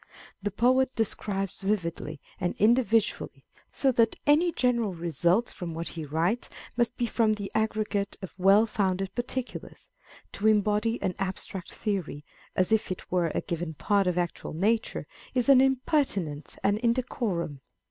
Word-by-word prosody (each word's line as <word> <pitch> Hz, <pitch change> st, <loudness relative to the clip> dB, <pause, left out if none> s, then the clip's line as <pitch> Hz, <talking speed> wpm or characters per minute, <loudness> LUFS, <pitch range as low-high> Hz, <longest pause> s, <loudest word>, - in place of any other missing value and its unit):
The 205 Hz, -, -1 dB
poet 255 Hz, +5 st, +2 dB
describes 195 Hz, -3 st, -2 dB
vividly 170 Hz, -7 st, -2 dB, 0.2 s
and 180 Hz, -1 st, -1 dB
individually, 225 Hz, 0 st, +2 dB, 0.3 s
so 270 Hz, -, +2 dB
that 230 Hz, -2 st, +3 dB
any 315 Hz, +4 st, +4 dB
general 235 Hz, -, +1 dB
results 170 Hz, -, +1 dB
from 170 Hz, -3 st, -6 dB
what 165 Hz, +1 st, -4 dB
he 160 Hz, -2 st, -6 dB
writes 165 Hz, +10 st, 0 dB, 0.3 s
must 240 Hz, 0 st, +1 dB
be 240 Hz, -, +1 dB
from 225 Hz, -2 st, +2 dB
the 205 Hz, -2 st, -6 dB
aggregate 215 Hz, -2 st, -1 dB
of 190 Hz, -, -7 dB
well 195 Hz, +4 st, +6 dB
founded 195 Hz, -3 st, -1 dB
particulars: 250 Hz, +1 st, -5 dB, 0.4 s
to 210 Hz, -, 0 dB
embody 215 Hz, +2 st, +2 dB
an 185 Hz, -, 0 dB
abstract 190 Hz, -1 st, -4 dB
theory, 180 Hz, -9 st, -3 dB, 0.3 s
as 185 Hz, +3 st, +1 dB
if 220 Hz, -1 st, +2 dB
it 185 Hz, -, -6 dB
were 180 Hz, -2 st, +2 dB
a -, -, +1 dB
given 170 Hz, -1 st, -4 dB
part 200 Hz, +5 st, +2 dB
of 180 Hz, -1 st, 0 dB
actual 175 Hz, -3 st, -2 dB
nature, 215 Hz, +8 st, 0 dB, 0.3 s
is 250 Hz, +1 st, +2 dB
an 265 Hz, -2 st, +8 dB
impertinence 255 Hz, -, 0 dB
and 205 Hz, +1 st, +2 dB
indecorum. 230 Hz, -, -1 dB
205 Hz, 145 wpm, -28 LUFS, 180-235 Hz, 0.4 s, an